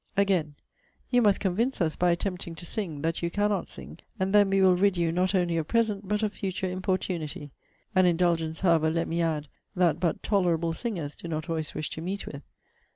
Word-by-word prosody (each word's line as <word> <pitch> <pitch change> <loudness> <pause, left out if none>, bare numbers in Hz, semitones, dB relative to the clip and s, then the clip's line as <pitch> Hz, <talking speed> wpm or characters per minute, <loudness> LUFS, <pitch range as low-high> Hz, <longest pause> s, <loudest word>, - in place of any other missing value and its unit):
Again, 180 -7 +2 0.6
'You 245 -1 +5
must 205 -3 +4
convince 220 +8 0
us, 160 -4 +1
by 180 - +2
attempting 175 -1 -2
to 175 - -9
sing, 170 -7 -4
that 165 +1 -1
you 170 - 0
cannot 205 +2 0
sing; - - -8 0.2
and 190 +1 0
then 205 -1 +6
we 195 0 +2
will 185 -1 +6
rid 195 0 +2
you, 170 -1 +1
not 185 +3 +1
only 175 -2 +1
of 160 -2 -1
present, 215 -4 0
but 210 +2 0
of 210 -1 0
future 190 -1 -3
importunity.' 180 -5 -3 0.4
An 185 -1 +5
indulgence, 165 -2 +1
however, 165 -4 +4
let 165 +1 0
me 170 +1 -1
add, 155 -3 -1 0.3
that 180 -3 +2
but 170 -3 -1
tolerable 170 -5 +1
singers 170 -8 -3
do - - -9
not 155 0 -4
always 160 -2 -3
wish 155 - -3
to 160 - -5
meet 190 +4 -4
with. 140 - -7
180 Hz, 205 wpm, -27 LUFS, 165-195 Hz, 0.6 s, then